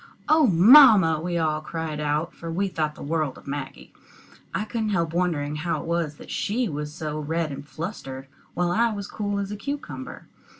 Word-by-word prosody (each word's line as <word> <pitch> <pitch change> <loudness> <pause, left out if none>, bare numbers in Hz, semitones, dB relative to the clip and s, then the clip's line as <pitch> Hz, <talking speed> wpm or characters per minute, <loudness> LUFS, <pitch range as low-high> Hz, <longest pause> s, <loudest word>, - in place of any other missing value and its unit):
"Oh, 310 -2 +5
mamma!" 200 - +7
we 175 +1 -2
all 155 -2 0
cried 160 -1 -5
out, 150 +3 -1
for 165 -1 -7
we 195 +4 0
thought 155 -4 -2
the - - -9
world 155 -2 -1
of - - -15
Maggie. 140 0 -7 0.6
I 210 - -2
couldn't 220 0 -2
help 170 -5 0
wondering 155 -4 -1
how 170 +3 -2
it - - -9
was 165 -3 -2
she 235 +4 -1
was 150 -2 -4
so 155 -1 -5
red 160 +1 -2
and 140 +1 -8
flustered, 135 -7 -6 0.3
while 175 0 +1
I 230 +5 +2
was 200 -1 -5
as - - -12
cool 205 -2 -2
as 200 0 -3
a - - -3
cucumber. 275 +3 -6
165 Hz, 195 wpm, -25 LUFS, 150-200 Hz, 0.6 s, mamma